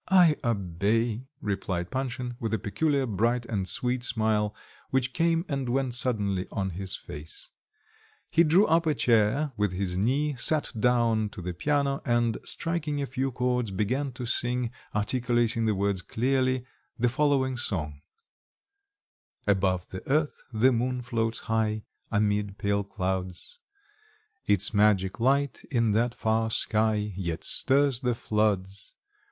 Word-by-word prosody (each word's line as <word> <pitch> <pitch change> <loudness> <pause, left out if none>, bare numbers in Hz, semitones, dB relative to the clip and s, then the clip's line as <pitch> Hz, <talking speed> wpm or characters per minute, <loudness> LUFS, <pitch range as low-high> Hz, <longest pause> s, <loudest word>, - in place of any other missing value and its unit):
"I 180 -5 +6
obey," 110 +3 0
replied 95 -4 -2
Panshin, 125 -2 -3
with 115 -3 -1
a - - 0
peculiar 140 +7 0
bright 120 +2 0
and 100 -5 -2
sweet 125 +7 0
smile, 110 -3 +1 0.3
which 130 -1 0
came 165 0 +1
and 135 -4 -2
went 130 0 0
suddenly 105 -7 0
on 95 -1 -2
his 95 +2 -3
face. 75 +2 -9 0.8
He 170 - +5
drew 170 +6 +5
up 165 +1 +2
a 155 - +2
chair 120 +5 +2
with 105 -3 0
his 90 -1 -2
knee, 140 +9 +1
sat 155 +5 +2
down 115 -2 +2
to 100 - -9
the 90 0 -3
piano, 140 - 0
and 120 -2 +1
striking 160 -3 -2
a 140 - -1
few 130 +1 -2
chords 125 -2 0
began 125 +9 -1
to 125 0 -6
sing, 120 0 0 0.2
articulating 120 +1 +1
the 105 - +2
words 100 -1 0
clearly, 130 +3 0 0.3
the 125 - +2
following 130 0 +1
song 75 - -2 1.4
Above 95 -3 +1
the 95 - -6
earth 150 +2 +1
the 120 +3 +4
moon 125 +1 -1
floats 115 -2 -1
high 110 -1 0 0.3
Amid 105 -2 0
pale 100 0 0
clouds; 95 - -4 0.9
Its 100 +1 +2
magic 100 -2 +3
light 140 +3 +1
in 115 -5 +2
that 115 +3 +1
far 110 0 +1
sky 110 -2 +1
Yet 85 -4 -3
stirs 140 -2 +3
the 125 -3 0
floods. 100 -3 -1
115 Hz, 140 wpm, -27 LUFS, 100-130 Hz, 1.4 s, I